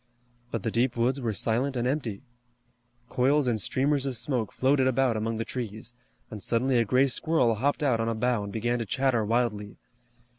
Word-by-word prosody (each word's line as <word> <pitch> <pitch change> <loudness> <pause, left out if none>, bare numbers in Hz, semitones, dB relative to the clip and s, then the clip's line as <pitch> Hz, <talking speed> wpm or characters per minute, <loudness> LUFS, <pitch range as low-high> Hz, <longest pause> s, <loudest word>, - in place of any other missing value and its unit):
But - - -4
the 115 - -1
deep 120 +2 0
woods 125 +4 +1
were 115 -2 -1
silent 120 +6 -1
and 120 0 0
empty. 130 -6 -3 0.8
Coils 135 +4 +2
and 115 -4 0
streamers 140 +3 0
of 130 -3 -2
smoke 120 -3 -2
floated 130 0 +2
about 130 -2 +2
among 110 +1 -2
the 115 +1 -3
trees, 115 -2 -5 0.4
and 105 -2 -7
suddenly 125 +3 +1
a 115 - +2
gray 130 +6 +3
squirrel 135 -2 +1
hopped 140 +7 0
out 125 -5 +2
on 115 0 0
a 115 - -1
bough 120 -1 0
and 100 - -6
began 120 +3 -1
to 115 - -2
chatter 130 -1 +1
wildly. 105 -2 -1
120 Hz, 190 wpm, -27 LUFS, 115-130 Hz, 0.8 s, gray